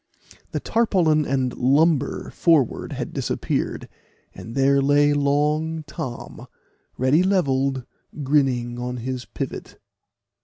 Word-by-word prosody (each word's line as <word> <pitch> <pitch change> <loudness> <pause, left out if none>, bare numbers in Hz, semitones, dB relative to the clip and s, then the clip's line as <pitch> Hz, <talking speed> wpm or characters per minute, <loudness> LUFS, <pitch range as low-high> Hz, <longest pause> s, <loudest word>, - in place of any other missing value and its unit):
The - - -2
tarpaulin 175 -10 +2
and 130 -2 0
lumber 145 +2 +2
forward 160 -8 +1
had - - -5
disappeared, - - -2 0.5
and 115 - -9
there 140 0 +3
lay 145 +1 +4
long 150 +3 0
Tom, 130 -4 -7 0.5
ready 130 +6 +3
levelled, 135 -9 +1 0.4
grinning 130 -4 +1
on 125 0 -4
his 125 +1 -4
pivot. - - -6
140 Hz, 105 wpm, -23 LUFS, 130-155 Hz, 0.5 s, lay